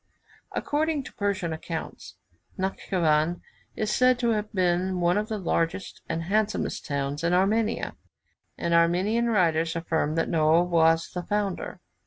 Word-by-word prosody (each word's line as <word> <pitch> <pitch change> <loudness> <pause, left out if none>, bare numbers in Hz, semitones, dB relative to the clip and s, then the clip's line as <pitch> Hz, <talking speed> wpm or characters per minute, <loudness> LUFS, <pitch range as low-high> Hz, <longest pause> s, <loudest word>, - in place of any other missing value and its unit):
According 300 -1 0
to - - -11
Persian 195 -5 -1
accounts, 160 - -6 0.4
Natschivan 175 -3 0 0.3
is 215 -1 -1
said 255 0 +4
to 240 -1 0
have 215 -1 -2
been 185 0 +1
one 175 0 +2
of 210 +1 0
the 220 - -2
largest 170 0 -2
and 165 - -2
handsomest 210 +4 -1
towns 140 +1 -2
of 170 +1 +2
Armenia; 215 +5 +1 0.6
and 170 - -1
Armenian 185 +8 +3
writers 165 -6 +2
affirm 160 -2 -1
that 165 - +1
Noah 160 +1 +3
was 165 -2 +3
the 180 - -4
founder. 205 0 -3
175 Hz, 140 wpm, -26 LUFS, 165-210 Hz, 0.6 s, said